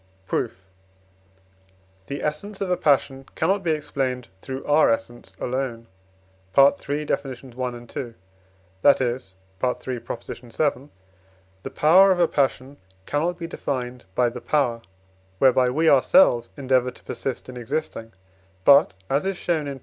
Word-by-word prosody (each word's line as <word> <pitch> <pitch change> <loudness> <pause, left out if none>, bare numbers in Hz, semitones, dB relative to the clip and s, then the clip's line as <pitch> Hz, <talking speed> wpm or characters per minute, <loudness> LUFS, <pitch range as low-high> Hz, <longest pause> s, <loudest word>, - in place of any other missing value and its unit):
Proof. 95 0 -3 1.4
The 140 - -5
essence 190 +7 -4
of 195 -2 -2
a - - +4
passion 135 -3 +1
cannot 195 +1 +1
be 175 - -2
explained 135 -6 -2
through 130 0 -6
our 150 +2 +4
essence 115 +1 -3
alone 125 -2 -3 0.7
(III. 145 +1 +3
Deff. - - 0
i. 135 - -7
and 125 -2 -6
ii.), 120 -4 -4 0.7
that 145 - +6
is 120 -7 -3 0.3
(III. 125 0 -1
vii.), 125 +5 -4 0.7
the - - -6
power 185 +6 +5
of 180 - +1
a 170 - +4
passion 135 -1 -1 0.3
cannot 165 +4 -1
be 170 - -5
defined 125 - -4
by 125 -1 +3
the 120 +1 -8
power, 125 -6 0 0.6
whereby 130 +2 +4
we 160 +6 +1
ourselves 135 - +5
endeavour 130 -2 +2
to - - -15
persist 135 - -5
in 125 - -9
existing, 125 -2 -4 0.5
but 140 -5 +6
(as 140 +2 +1
is 195 -2 -2
shown 160 -4 -1
in 140 -1 -5
II. - - -16
135 Hz, 140 wpm, -24 LUFS, 125-150 Hz, 1.4 s, that